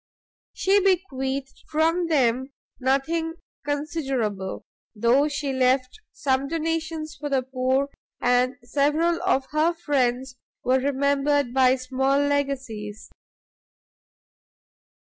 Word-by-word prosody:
She 395 +2 +3
bequeathed 275 -9 -1
from 330 +3 +2
them 260 -3 +1 0.3
nothing 315 +6 0 0.3
considerable, 270 - -2 0.3
though 240 +7 +3
she 285 -2 -2
left 255 +4 +1
some 270 -1 0
donations 320 -1 -2
for 295 0 -5
the 270 -2 +1
poor, 260 +1 0 0.3
and 250 +1 +2
several 295 +7 +1
of 275 -8 +2
her 315 +3 +2
friends 260 -5 0 0.3
were 260 +1 +3
remembered 280 0 +1
by 260 -1 +5
small 265 +1 0
legacies. 270 -7 -2
275 Hz, 95 wpm, -25 LUFS, 255-305 Hz, 0.3 s, by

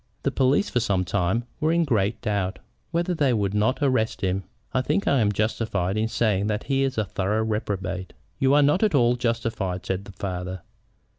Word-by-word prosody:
The - - +1
police 135 +8 +2
for 125 - 0
some 100 -5 0
time 100 +5 0 0.2
were 155 0 +2
in 170 0 +3
great 110 -8 +1
doubt 100 -4 -1 0.3
whether 170 +2 0
they 145 -6 +2
would 100 -3 0
not 110 +7 +1
arrest 130 -7 +1
him. 95 0 -1 0.3
I 130 - +2
think 150 +9 0
I 140 - +4
am 105 -3 +3
justified 105 -3 -1
in 110 +1 +1
saying 105 -3 +1
that 105 0 -1
he 135 -1 0
is 135 -2 0
a 110 - +1
thorough 100 +3 -1
reprobate." 100 -4 -3 0.3
"You 135 +1 +4
are 145 - +6
not 150 +6 +3
at 215 -7 +3
all 120 -2 +4
justified," 115 -6 -2
said 95 +1 -2
the 100 - -10
father. 90 -2 -5
110 Hz, 200 wpm, -25 LUFS, 95-130 Hz, 0.3 s, are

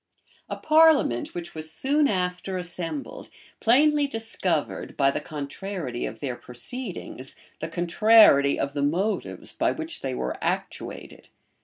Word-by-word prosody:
A - - -3
parliament, 310 - +4
which 175 -1 -6
was 155 0 -2
soon 285 - +3
after 185 -1 -2
assembled, 180 - -4 0.3
plainly 290 +5 +4
discovered, 210 - -2
by 135 -1 +4
the - - -3
contrariety 150 -2 -5
of 110 - -9
their 130 -4 -3
proceedings, 135 - -6 0.2
the 160 - -4
contrariety 175 -4 +5
of 140 0 -2
the 145 - -2
motives 180 +9 -1
by - - +1
which 325 0 -4
they 130 -2 -3
were 65 - -3
actuated. - - -4
180 Hz, 130 wpm, -25 LUFS, 140-235 Hz, 0.3 s, contrariety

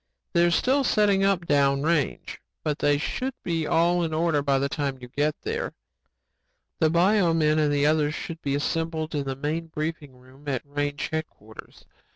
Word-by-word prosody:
They're 170 0 +4
still 260 +11 +2
setting 205 -5 +3
up 195 -3 +2
down 140 -2 +2
range 155 -3 -1 0.2
but 150 -1 -1
they 145 0 +3
should 255 - -3
be 165 -3 -1
all 175 +1 +2
in 160 -1 -2
order 160 -2 +1
by 140 -1 +2
the 140 +1 0
time 140 -1 -2
you 125 - -10
get 145 +4 0
there. - - -3 1.1
"The 160 - +4
bio 175 +1 +3
men 155 -1 +3
and 150 -1 +2
the 145 0 +2
others 150 0 +2
should 165 -1 -6
be 140 -1 -1
assembled 160 +2 -2
in 145 -2 -1
the 135 -1 -3
main 155 +4 -3
briefing 155 -4 -5
room 130 +3 -18
at 135 -3 -1
range 145 0 -3
headquarters. 135 -9 -8
155 Hz, 180 wpm, -25 LUFS, 145-165 Hz, 1.1 s, They're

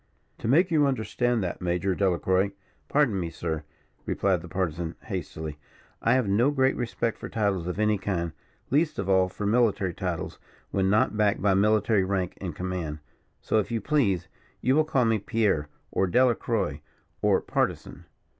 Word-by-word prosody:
"To - - -4
make 170 +9 +4
you 150 -3 +4
understand 120 -2 0
that, 90 - -4
Major 90 +2 0
Delacroix 95 +1 +1 0.2
" - - -39
"Pardon 140 -9 +2
me, 85 -2 -2
sir," 80 -2 -3 0.5
replied 95 -3 +1
the 90 - -9
Partisan, 85 -2 -2
hastily, 75 -2 -5 0.4
"I 115 - +3
have 130 -5 +1
no 110 +7 +3
great 135 -2 +2
respect 115 -1 -2
for - - -6
titles 100 -6 0
of 90 - -3
any 105 -1 +2
kind, 90 -4 -2 0.4
least 155 +3 +2
of 100 - -2
all 95 -1 +3
for 105 - -5
military 105 -4 +2
titles, 90 -1 -4 0.3
when 95 -1 +1
not 105 +1 +3
backed 105 -2 +1
by 100 -1 +4
military 105 +1 +3
rank 95 -2 -1
and 90 -5 -4
command. 90 -4 -3 0.4
So, 110 - +1
if 105 - -2
you 115 -1 -1
please, 105 - +1 0.3
you 130 +3 +2
will 155 0 +4
call 135 -5 +2
me 110 -1 +2
Pierre, 100 -9 0 0.2
or 95 - +1
Delacroix, 125 +5 +1 0.4
or - - +4
Partisan." - - -2
100 Hz, 170 wpm, -27 LUFS, 90-115 Hz, 0.5 s, make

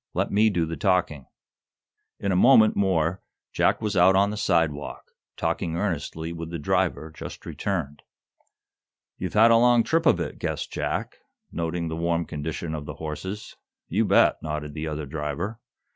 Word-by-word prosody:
Let - - 0
me 110 +2 +4
do 85 -5 0
the 80 +1 -4
talking." 90 -8 0 0.9
In 100 - -1
a - - +2
moment 110 +2 +6
more 95 -2 +1 0.3
Jack - - +2
was 105 - -1
out 95 +2 +5
on 100 +1 +3
the - - -4
sidewalk, 80 -7 -1 0.3
talking 80 - -1
earnestly 85 -3 -3
with 85 -1 -6
the 85 - -4
driver 90 -1 0
just - - -9
returned. 80 -8 -3 1.2
"You've 90 +2 -4
had 115 +2 +7
a 115 - +7
long 120 0 +5
trip 165 +4 +1
of 90 - +4
it," 80 -5 -4
guessed - - -3
Jack, - - -3 0.3
noting 85 0 -2
the 80 - -3
warm 85 0 0
condition 80 +2 -4
of 75 -2 -5
the 75 - -6
horses. 80 +8 -6 0.3
"You 110 +6 +1
bet," - - +4
nodded 75 -1 -4
the 80 +1 -4
other 75 -1 -4
driver. 80 +9 -4
85 Hz, 165 wpm, -25 LUFS, 80-100 Hz, 1.2 s, had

